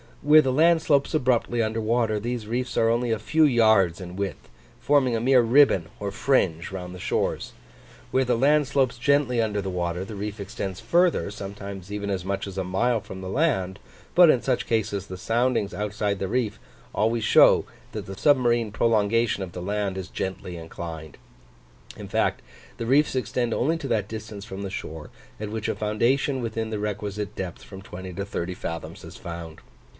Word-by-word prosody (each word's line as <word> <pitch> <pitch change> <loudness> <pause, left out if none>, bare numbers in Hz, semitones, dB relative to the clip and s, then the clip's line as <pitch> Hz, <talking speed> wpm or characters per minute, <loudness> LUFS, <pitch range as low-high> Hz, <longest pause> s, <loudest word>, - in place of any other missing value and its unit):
Where 150 +1 +7
the 130 -3 0
land 165 +3 +4
slopes 145 -1 +2
abruptly 120 -4 +1
under 110 +1 -1
water, 110 -1 +1
these 120 0 -3
reefs 125 +3 -2
are 115 - +4
only 120 +1 +1
a 110 - 0
few 130 +10 +2
yards 110 - +4
in 90 0 -8
width, 100 -1 -4 0.3
forming 135 -4 +3
a - - 0
mere 125 +2 +5
ribbon 120 - +4
or 100 -1 -3
fringe 95 - +1
round 90 -1 -6
the 90 - -9
shores: - - -1 0.6
where 130 0 +2
the 125 -1 +1
land 145 +3 +3
slopes 130 -3 +1
gently 135 -3 +2
under 105 -2 -1
the 95 - -4
water 90 0 -2
the 105 - -8
reef 105 +1 -5
extends 95 -1 -5
further, 175 - +2
sometimes 100 -1 -8
even 100 0 -3
as 95 -3 -2
much 100 0 -2
as 95 -1 -8
a 95 - 0
mile 110 +6 +1
from 95 -1 -9
the 95 - -6
land; 100 - 0 0.3
but 175 -2 +7
in 130 -5 +3
such 130 -2 0
cases 105 -4 -1
the 95 -2 -8
soundings 115 0 0
outside 105 -1 -2
the 95 - -2
reef 115 0 -1 0.3
always 115 +1 +1
show - - +6 0.3
that - - -5
the 95 0 -7
submarine 120 -5 +3
prolongation 115 0 +2
of 90 -3 -6
the 90 - -6
land 100 0 -2
is 95 -1 -5
gently 95 -2 -5
inclined. 80 -2 -8 0.8
In - - -8
fact, - - 0 0.4
the 115 - -4
reefs 140 +3 +3
extend 125 -2 -1
only 160 +7 +1
to 155 -4 -5
that 110 -5 0
distance 110 -2 -7
from 95 -2 -7
the 95 - -5
shore, 80 -4 -6 0.3
at 105 -1 -4
which 110 0 -3
a - - -1
foundation 125 +6 +1
within 115 -1 -3
the 105 - -2
requisite 105 0 -4
depth 90 -3 -6
from 95 -1 -10
20 95 0 -8
to 100 +2 -4
30 90 -2 -4
fathoms 85 -2 -6
is - - -10
found. 85 -2 -8
110 Hz, 190 wpm, -25 LUFS, 95-125 Hz, 0.8 s, Where